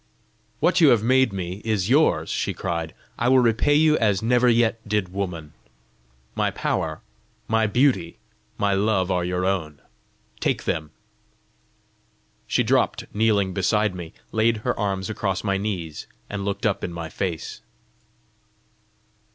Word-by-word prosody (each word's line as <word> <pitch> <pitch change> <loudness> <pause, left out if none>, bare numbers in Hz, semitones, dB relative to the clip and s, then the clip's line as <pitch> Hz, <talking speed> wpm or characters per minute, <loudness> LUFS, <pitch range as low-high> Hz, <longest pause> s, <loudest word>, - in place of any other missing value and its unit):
"What - - +2
you 160 - +7
have 115 -4 +4
made 130 0 +3
me 95 0 -5
is 105 -4 0
yours!" 145 +6 +3
she - - -2
cried. 85 -3 -3 0.2
"I 120 - +2
will 130 - +5
repay 125 +4 +3
you 155 0 +4
as 105 -3 +1
never 125 +1 +3
yet 115 -1 +2
did 105 -3 0
woman! 85 -6 -4 0.8
My - - 0
power, 80 -1 -2 0.5
my 110 0 +2
beauty, 120 -6 +1 0.4
my 100 -1 +1
love 100 -2 +1
are 90 -1 +1
your 90 +1 -1
own: 80 -7 -2 0.6
take - - -1
them." 80 -2 -2 1.6
She - - +2
dropt - - +1
kneeling 105 -3 +2
beside 105 +2 +1
me, 85 -3 -8 0.2
laid 110 +1 +2
her 125 - +2
arms 95 -2 -1
across 100 -3 -2
my 100 -2 0
knees, 95 -6 -4 0.2
and 100 -1 -3
looked 100 +1 -3
up 105 -3 0
in 85 - -3
my 85 -1 -5
face. 85 0 -4
100 Hz, 145 wpm, -23 LUFS, 90-115 Hz, 1.6 s, you